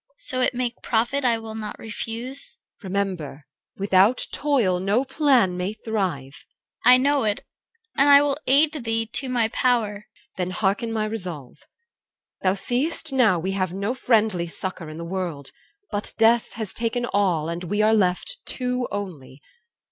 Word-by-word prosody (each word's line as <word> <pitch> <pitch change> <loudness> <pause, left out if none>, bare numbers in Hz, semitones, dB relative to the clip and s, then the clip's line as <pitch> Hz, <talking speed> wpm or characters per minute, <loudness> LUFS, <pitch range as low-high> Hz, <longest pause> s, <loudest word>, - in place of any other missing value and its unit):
CHR. - - -41
So 270 - +1
it 250 - +1
make 245 -1 -3
profit, 240 +5 0
I 235 -2 +3
will 225 -1 -8
not 215 -1 -6
refuse. 230 +4 -4 0.2
EL. - - -12
Remember, 180 -8 -3 0.3
without 195 +4 +3
toil 240 -12 +1
no 205 +8 +1
plan 265 - +3
may 180 +3 -2
thrive! 185 - -3 0.4
CHR. 245 - +5
I 250 - +9
know 280 +2 +2
it, 210 -2 -1 0.5
and 285 +1 +6
will 280 -1 +1
aid 295 +4 +5
thee 225 0 0
to 255 +4 -1
my 235 -3 +1
power. 235 -4 +1
EL. 205 - -11 0.3
Then 180 -1 -1
hearken 200 +4 -1
my 220 -1 -1
resolve. 180 - -6 0.8
Thou 185 -1 +2
seëst 265 +9 -2
now, 245 -9 +4
We 185 +4 -2
have 185 -2 -1
no 200 +5 -2
friendly 220 -8 +1
succour 170 -1 -6
in 155 - -8
the 170 - -6
world; 170 -6 -4 0.4
But 205 0 -2
death 225 +1 +3
has 220 -4 -5
taken 235 +1 -1
all, 185 -8 +1
and 170 +2 -4
we 205 +4 0
are 215 +1 +4
left 210 - +1
Two 250 -1 -2
only. 165 -10 -6
220 Hz, 165 wpm, -24 LUFS, 185-250 Hz, 0.8 s, I